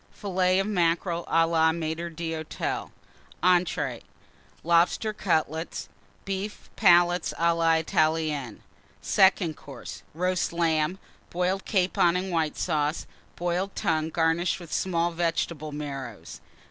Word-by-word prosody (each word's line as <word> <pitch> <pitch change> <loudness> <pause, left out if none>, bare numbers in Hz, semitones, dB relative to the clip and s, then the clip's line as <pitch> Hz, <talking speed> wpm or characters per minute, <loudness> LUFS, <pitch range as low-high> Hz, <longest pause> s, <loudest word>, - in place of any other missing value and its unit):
Fillets 185 -2 +1
of - - -2
Mackerel 170 -3 0
à 165 0 +3
la 160 -1 +3
Maître 165 +1 -3
d'Hôtel. 160 -1 -4 0.5
ENTREES. 180 -1 +2 0.6
Lobster 170 +6 +2
Cutlets. 160 -4 -1 0.4
Beef 195 +2 -5
Palates 175 -3 +4
à 170 0 +3
la 165 -1 +3
Italienne. 155 -6 0 0.4
SECOND 190 -4 +3
COURSE. 135 -3 -10
Roast 180 +1 0
Lamb. 165 0 +1 0.3
Boiled 180 +2 -1
Capon 180 -3 +2
and 185 +1 -2
White 160 -3 0
Sauce. 155 -2 -1 0.3
Boiled 180 +3 -2
Tongue, 160 -1 0
garnished 165 +2 +1
with 170 -3 -9
small 175 -2 0
Vegetable 165 -2 -2
Marrows. 135 -6 -7
170 Hz, 110 wpm, -26 LUFS, 160-180 Hz, 0.6 s, Palates